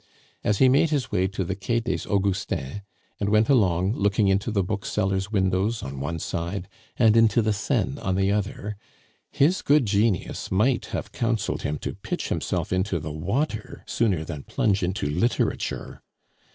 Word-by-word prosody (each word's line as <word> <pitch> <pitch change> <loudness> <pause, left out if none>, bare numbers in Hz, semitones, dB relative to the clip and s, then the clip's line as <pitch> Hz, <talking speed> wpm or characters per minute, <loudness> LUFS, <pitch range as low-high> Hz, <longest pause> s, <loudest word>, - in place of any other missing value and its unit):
As 105 -1 +2
he 130 - +6
made 140 +5 +4
his 145 -4 -1
way 95 +1 +2
to 95 0 -3
the 95 +2 -3
Quai 115 +4 -1
des 95 -7 -3
Augustins, 95 -5 -1 0.4
and 100 - 0
went 110 +1 +3
along, 95 -6 +3
looking 100 -1 +2
into 95 +4 +1
the 100 -3 +1
booksellers' 95 0 -1
windows 95 +2 +1
on 70 0 -6
one 75 +5 -3
side 85 +4 -3 0.3
and 110 -3 +5
into 115 -1 +5
the 110 -1 +2
Seine 70 -8 -1
on 95 -1 -1
the 95 +1 +2
other, 105 +1 -2 0.5
his 165 +7 +3
good 145 -2 +4
genius 100 -2 0
might 115 +7 +2
have - - -4
counseled 115 -3 -1
him 75 +1 -2
to - - -4
pitch - - -4
himself - - -1
into 95 -1 0
the 75 0 -5
water 105 - -2
sooner 95 -9 +1
than 75 -3 -6
plunge 100 +6 0
into 90 0 -1
literature. 90 +12 -1
100 Hz, 165 wpm, -25 LUFS, 95-110 Hz, 0.5 s, he